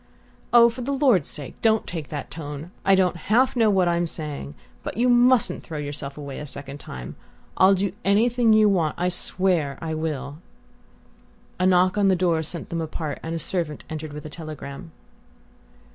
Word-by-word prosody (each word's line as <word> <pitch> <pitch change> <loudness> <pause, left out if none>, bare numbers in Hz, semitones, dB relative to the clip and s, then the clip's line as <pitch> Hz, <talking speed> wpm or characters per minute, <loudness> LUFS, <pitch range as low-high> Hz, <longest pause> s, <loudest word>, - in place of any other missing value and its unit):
"Oh, 235 -1 +8
for 235 +2 -4
the 260 +3 -2
Lord's 260 - +3
sake 145 -3 -5
don't 220 -1 +3
take 160 -4 -5
that 145 -2 -6
tone! 150 +1 -7
I 195 - +5
don't 185 -2 +2
half 225 +12 +2
know 225 -3 +4
what 190 -3 +3
I'm 170 0 +1
saying...but 145 - -6
you 245 +2 +3
mustn't 245 -1 +4
throw 160 - -7
yourself 145 -1 -5
away 140 -2 -7
a 150 - -6
second 140 +1 -6
time. 65 - -8 0.4
I'll 190 +1 +6
do 195 0 -1
anything 230 +4 +3
you 215 0 +6
want 170 -7 +1
I 180 +1 +1
swear 175 -5 0
I 160 -1 -4
will!" 150 -2 -4 1.2
A 185 - +3
knock 185 +2 +3
on 200 - +4
the 190 - +4
door 170 -3 +1
sent 160 +2 -7
them 170 -1 -2
apart, 155 -2 -4
and 165 +1 -4
a - - -1
servant 165 -2 -2
entered 155 -1 -5
with 150 +1 -8
a - - -6
telegram. 155 0 -8
170 Hz, 180 wpm, -24 LUFS, 150-200 Hz, 1.2 s, Oh